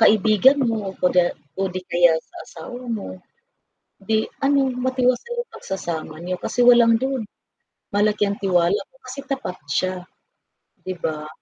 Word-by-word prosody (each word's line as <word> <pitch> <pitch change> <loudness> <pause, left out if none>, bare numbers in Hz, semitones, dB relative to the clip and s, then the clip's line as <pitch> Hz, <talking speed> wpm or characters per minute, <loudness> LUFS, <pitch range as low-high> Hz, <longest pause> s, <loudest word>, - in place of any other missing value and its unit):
kaibigan 220 +5 +5
mo 210 -4 -2
o 180 - 0
di 180 -1 +6 0.3
o 195 - 0
di 185 - -3
kaya 175 -1 +5
sa - - -16
asawa 245 +10 -9
mo, 200 - -6 1.0
'di 220 +1 +2 0.3
ano, 280 0 +4 0.3
matiwasay 255 - +1
yung 480 -1 -5
pagsasama 170 -4 -5
niyo 185 +1 -2
kasi - - -3
walang 235 -1 +6
duda 265 -4 -1 0.7
malaki 210 0 +2
ang 200 0 -3
tiwala 180 0 +3
ko - - -26
kasi 260 +2 -6
tapat 265 -9 -3
siya, 185 +6 0 0.9
di 185 0 -5
ba? 155 -2 -3
210 Hz, 145 wpm, -22 LUFS, 180-250 Hz, 1.0 s, di